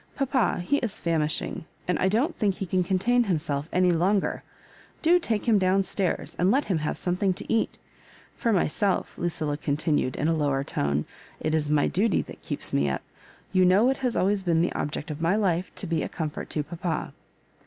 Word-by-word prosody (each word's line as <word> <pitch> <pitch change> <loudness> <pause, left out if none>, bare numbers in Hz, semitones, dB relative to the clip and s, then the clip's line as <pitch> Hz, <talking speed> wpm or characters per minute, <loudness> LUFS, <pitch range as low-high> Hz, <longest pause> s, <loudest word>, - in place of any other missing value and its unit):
Papa, 265 -8 +1
he 230 +11 +1
is 225 -5 -3
famishing, 160 -2 -1 0.2
and 180 - +1
I 190 - +3
don't 255 - +1
think 200 -3 +1
he 195 - -4
can 185 0 +1
contain 220 +7 +2
himself 155 -5 -1
any 180 0 +3
longer. 185 +4 +1 0.6
Do 345 +2 +5
take 230 - -1
him 220 -3 +5
down 190 +1 +3
stairs, 190 -1 -2
and 180 - +3
let 275 +7 +3
him 180 -5 0
have 150 - -2
some 180 -1 -1
thing 190 -1 +2
to - - -4
eat 225 - 0 0.6
For 235 - 0
myself," 195 0 +1
Lucilla 160 -4 -2
continued, 145 -2 0
in 150 - 0
a 165 - +3
lower 140 -3 +1
tone, 70 - -1 0.3
''it 155 - -1
is 155 -2 +1
my 150 -1 +3
duty 200 +1 +1
that - - -12
keeps - - -5
me 70 0 +2
up. 65 - -3 0.5
You 185 -1 +5
know 200 +8 +5
it 270 - -2
has 250 -3 -1
always 200 +1 +2
been 170 -3 +2
the - - 0
object 150 +1 -3
of 150 +1 -6
my 170 +4 +2
life 185 -4 0
to - - -5
be 165 -2 0
a - - -3
comfort 155 -3 -4
to 150 - -1
papa." 170 0 -4
180 Hz, 205 wpm, -26 LUFS, 155-205 Hz, 0.6 s, Do